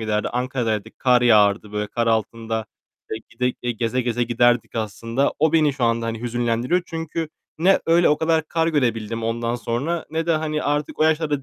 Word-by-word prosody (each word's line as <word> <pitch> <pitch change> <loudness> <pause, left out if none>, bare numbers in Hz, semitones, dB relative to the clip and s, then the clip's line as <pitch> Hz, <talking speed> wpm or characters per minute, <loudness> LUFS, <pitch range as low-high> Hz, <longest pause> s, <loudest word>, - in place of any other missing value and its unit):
giderdi. 105 -1 -1
Ankara'daydık, 120 -4 -2
kar 125 -1 +3
yağardı, 105 -2 +4
böyle, 105 0 -2
kar 115 +2 -2
altında 110 0 -1 0.4
e - - -2 0.2
gide 125 +2 0
gide, 120 -1 -4
geze 115 +3 -1
geze 120 -1 -1
giderdik, 120 0 +2
aslında. 115 +4 -1
O 160 +1 +3
beni 155 -3 +4
şu 130 - -1
anda, 115 0 +1
hani, 115 -1 -4
hüzünlendiriyor. 120 +7 0
Çünkü 165 -1 -4 0.3
ne 190 +4 +4
öyle 170 +1 +4
o 150 - +3
kadar 160 0 +2
kar 165 -1 +1
görebildim 115 -7 -1
ondan 115 +1 -1
sonra 125 +8 -2
ne 165 +1 -2
de, 170 - +3
hani, 155 -1 -1
artık 145 0 -2
o - - +2
yaşlarda 155 -3 +1
120 Hz, 185 wpm, -22 LUFS, 115-150 Hz, 0.4 s, yağardı